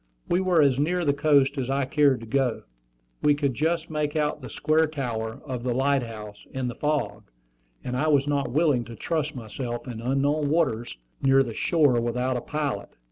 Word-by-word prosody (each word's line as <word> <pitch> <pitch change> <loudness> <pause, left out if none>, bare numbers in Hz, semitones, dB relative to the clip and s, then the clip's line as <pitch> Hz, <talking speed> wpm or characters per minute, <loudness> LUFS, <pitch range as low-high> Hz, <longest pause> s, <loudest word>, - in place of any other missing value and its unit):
We 180 - +2
were 180 -4 +4
as 135 -2 +3
near 175 +4 +1
the 140 - +3
coast 140 -1 +3
as 130 -1 -2
I 135 0 +1
cared 140 -3 +3
to - - -8
go. 125 0 0 0.6
We 145 - +4
could 140 -2 0
just 160 +4 -1
make 150 -1 -1
out 150 -1 0
the 125 - -8
square 160 +1 +2
tower 120 -7 -4
of 130 -4 -4
the 125 0 -1
light 135 +1 +2
house 105 -3 -8
in 130 -1 -1
the 120 - -3
fog, 150 - -2 0.5
and 125 - -3
I 145 +5 0
was 145 -2 +3
not 145 -1 0
willing 145 -3 +2
to 115 - -9
trust 155 +3 -2
myself 120 +2 -5
in 115 -2 -6
unknown 140 +4 +1
waters 130 - 0 0.2
near 135 0 +5
the 120 -3 -6
shore 145 -3 +2
without 125 +2 -1
a 125 - -2
pilot. 145 -9 -3
140 Hz, 195 wpm, -26 LUFS, 125-150 Hz, 0.6 s, near